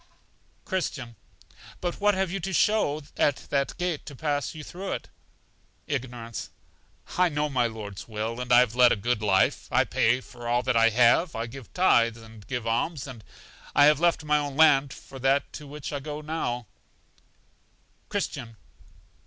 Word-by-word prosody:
Christian. 140 - -3 0.6
But 175 +2 -4
what 205 -1 +4
have 190 -2 0
you 195 - -2
to 190 +2 -4
show 155 -7 +2
at 145 - +3 0.2
that 140 -1 0
gate 175 -4 -2
to 145 - -8
pass 145 +2 -2
you 155 - -7
through 190 +5 -5
it? - - -6 0.8
Ignorance. 120 -6 -5 0.7
I 180 -1 +5
know 150 -1 -1
my 125 -4 +2
Lord's 105 -3 -8
will, 115 +2 -4
and 125 0 -5
I 120 0 +8
have 120 -3 +1
led 125 0 +6
a - - +4
good 115 +1 -1
life; 95 -3 +2
I - - +4
pay 120 +3 +2
for 120 -2 -10
all 120 +1 +1
that 130 -1 0
I 115 0 +5
have, 120 +9 +4
I 115 - -2
give 125 +1 -10
tithes, 120 -11 +4
and 110 -2 -14
give 125 -3 -3
alms, 130 +6 -1
and 125 -6 -10 0.5
have 150 0 +6
left 170 -1 +2
my 150 0 +2
own 145 -1 -4
land 145 -4 +5
for 135 - -11
that 135 +2 +1
to 150 - -8
which 150 +1 -7
I - - -1
now - - -13
go. 150 -5 -3 1.4
Christian. 115 -2 -4
135 Hz, 170 wpm, -27 LUFS, 115-150 Hz, 1.4 s, I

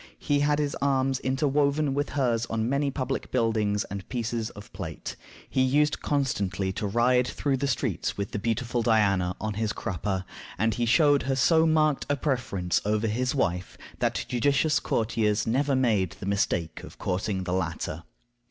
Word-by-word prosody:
He 145 -1 0
had 145 +1 +2
his 145 -1 0
arms 135 -1 +1
interwoven 140 +2 +1
with 145 +1 -1
hers 120 -4 +1
on 110 0 -1
many 140 +2 +1
public 135 0 -3
buildings 110 -4 +1
and 100 -1 -7
pieces 120 -2 -2
of 100 -1 -13
plate. 90 -5 -6 0.3
He 130 - 0
used 145 +3 +2
constantly 100 -9 -1
to 105 - -2
ride 125 +4 +3
through 140 0 -1
the 140 +2 -1
streets 125 - -1
with 100 0 -3
the 105 - -3
beautiful 115 +2 -1
Diana 100 -6 +2
on 110 -1 -2
his 110 +1 -1
crupper; 95 -1 -3 0.3
and 110 +3 +1
he 120 +2 -1
showed 145 +2 +5
her 135 - +2
so 160 +5 +4
marked 155 -2 +2
a 145 - +3
preference 125 - -1
over 105 +1 0
his 125 +5 0
wife 90 -8 -1 0.2
that - - 0
judicious 145 +5 +2
courtiers 110 -2 0
never 135 +4 +1
made 105 -9 +2
the 95 +2 -9
mistake 100 -4 -1
of - - -11
courting 95 +1 -2
the 90 -1 -2
latter. 80 -3 -2
120 Hz, 170 wpm, -27 LUFS, 100-140 Hz, 0.3 s, showed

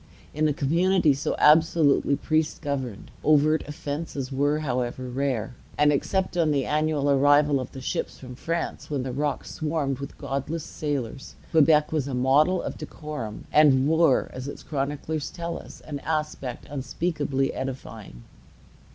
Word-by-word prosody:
In 155 +1 +2
a - - +2
community 165 +3 +3
so 135 - -2
absolutely 155 -2 +4
priest 155 +2 -1
governed, 130 -7 -4
overt 155 +1 +4
offences 145 -3 -5
were, 145 +3 +1
however, 125 -2 -2
rare; 125 -3 -2 0.2
and, 150 0 +4
except 190 +6 -1
on 165 -3 +2
the 140 -3 +1
annual 150 -1 +1
arrival 145 +1 +4
of 130 - -6
the 130 - -8
ships - - -3
from 125 -1 -9
France, 165 +6 -3
when 140 -4 -1
the 130 - -3
rock 145 +2 -1
swarmed 150 -4 -2
with 140 - -7
godless 145 +4 -3
sailors, 140 -3 -4 0.2
Quebec 150 -1 +4
was 150 -4 0
a 135 - -3
model 145 +8 +3
of - - -5
decorum, 150 -9 -6
and 140 -3 +5
wore, 160 -3 +3
as 130 +1 -6
its 140 - -7
chroniclers 145 +1 -3
tell 170 -1 -5
us, - - -12
an 145 -2 -6
aspect 150 -5 -3
unspeakably 145 -1 -1
edifying. 115 - -7
145 Hz, 150 wpm, -25 LUFS, 135-155 Hz, 0.2 s, and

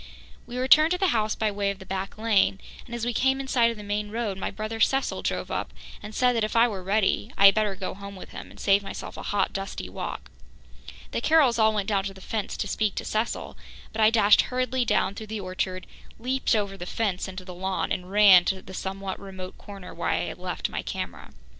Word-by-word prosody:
We 245 - -6
returned 305 +5 +6
to - - 0
the 380 -1 +2
house 215 -4 +1
by 215 -1 0
way 200 0 -1
of 200 - -3
the 190 - -12
back 190 +1 -4
lane 215 -3 +2 0.3
and, 235 - -6
as 235 -1 -3
we 240 - -1
came 265 +3 +2
in 270 - -5
sight 240 -3 +4
of 230 - -5
the 210 - -8
main 205 +1 -2
road, 220 -2 -2
my 190 - -3
brother 215 +1 -5
Cecil 270 +4 +2
drove - - -2
up - - -2 0.3
and 210 +1 -9
said 250 -1 +3
that 225 - +1
if 215 - -2
I 230 +1 +6
were 200 -5 -5
ready, 195 +2 +1
I 200 - +6
had 195 - +10
better 210 -2 0
go 190 0 -4
home 200 +1 -9
with 185 - -10
him - - -8
and - - -15
save 200 0 +4
myself 195 - -7
a - - -7
hot, 205 - 0
dusty 195 0 -5
walk. - - -6 0.8
The - - -2
Carrolls 285 -8 +4
all 220 0 +5
went 210 -2 -2
down 200 -3 +1
to 195 -1 -5
the - - -12
fence 210 +2 -4
to 205 - -2
speak 210 0 0
to - - -4
Cecil, 220 +2 -2 0.4
but 220 - -2
I 215 - +7
dashed 215 -2 +6
hurriedly 255 0 0
down 195 -3 +2
through 215 +1 -8
the 220 0 -4
orchard, 185 0 -3 0.3
leaped 255 +1 0
over 200 -2 -1
the 175 -1 -7
fence 200 -4 -1
into 185 -1 -8
the 180 - -8
lawn 190 +1 -2
and 180 0 -2
ran 200 -3 +8
to 190 -1 -1
the 190 - -11
somewhat 190 0 -4
remote 190 -2 -9
corner 200 -2 -10
where - - -2
I - - +1
had - - -6
left - - -3
my - - -4
camera. - - -6
210 Hz, 240 wpm, -26 LUFS, 195-230 Hz, 0.8 s, had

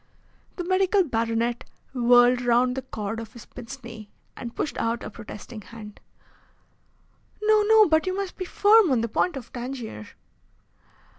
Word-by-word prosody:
The 355 - -4
medical 380 +2 +2
baronet 230 -3 -1 0.3
whirled 245 0 +5
round 245 +1 +2
the 265 - -3
cord 220 -4 -5
of 225 0 -9
his 235 -3 -12
pince 260 +2 -10
nez 225 -2 -10 0.3
and 235 -2 -8
pushed 300 - -3
out 230 +1 -1
a - - -7
protesting 215 +1 -10
hand. 210 +1 -12 1.4
"No, 430 0 +4
no, 440 -1 +6
but 315 +2 +2
you 370 +1 -1
must 395 -2 -4
be 370 - -5
firm 415 +1 +5
on 255 -4 +2
the 230 - -1
point 285 +7 0
of 245 - -10
Tangier." 240 - -6
245 Hz, 155 wpm, -25 LUFS, 230-350 Hz, 1.4 s, no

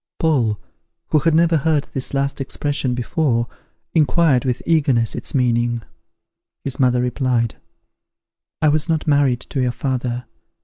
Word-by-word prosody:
Paul, 125 -10 +1 0.5
who 155 - +3
had 160 +2 +2
never 165 0 +4
heard 150 -1 +1
this 130 - -3
last 140 0 -1
expression 135 -1 -1
before, 125 -1 0 0.5
inquired 155 -4 +3
with 125 -1 -1
eagerness 140 -9 +2
its - - -3
meaning. 120 -2 +1 0.8
His 135 +1 -1
mother 125 -2 +3
replied, 125 -2 0 1.1
"I 155 - +5
was 155 +2 +1
not 160 -2 0
married 140 -5 +2
to 135 - -2
your 125 -1 +1
father. 125 -2 -3
135 Hz, 135 wpm, -20 LUFS, 125-150 Hz, 1.1 s, I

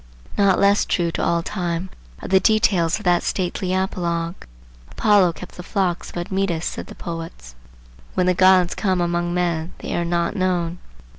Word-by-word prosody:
Not 200 -2 +4
less 200 +1 +4
true 170 -2 0
to - - -2
all 170 0 +1
time 175 -1 -3 0.3
are - - -5
the 190 - +4
details 185 -5 +2
of 210 - -11
that 175 -1 +3
stately 185 0 -2
apologue. 170 -3 -1 0.6
Apollo 200 -5 +3
kept 180 - -11
the - - -6
flocks 180 -1 -1
of - - -9
Admetus, 175 -1 -1
said - - -4
the - - -11
poets. 165 - -7 0.6
When 185 - +2
the 180 - +3
gods 185 -1 +5
come 190 -3 0
among 175 0 0
men, 170 -2 -1
they - - -5
are 175 - 0
not 170 0 -1
known. 180 -2 -1
180 Hz, 170 wpm, -21 LUFS, 170-190 Hz, 0.6 s, gods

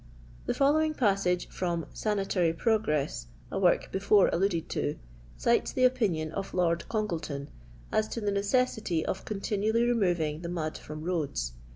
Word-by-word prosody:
The - - 0
following 310 +3 +3
passage 195 -7 +1
from 170 -3 -2
"Sanatory 195 -5 0
Pro 220 +5 +2
gTMS^" 140 - -2 0.2
a - - -1
work - - +2
before 200 +1 +4
alluded 175 -2 +1
to, 145 - -1 0.4
cites 235 - +2
the 255 - +1
opinion 205 -12 +2
of 195 +3 -5
Lotd 170 -2 +1
Oongleton 160 -10 -3 0.4
as 215 0 +2
to 230 - -4
the 205 -2 -1
necessity 200 -4 +1
of 190 - -3
con 205 -2 -4
tinually 220 +4 +1
removing 175 -9 +1
the 170 - -5
mud 160 -3 -3
from 155 0 -8
roads. 145 - -2
190 Hz, 155 wpm, -29 LUFS, 165-215 Hz, 0.4 s, before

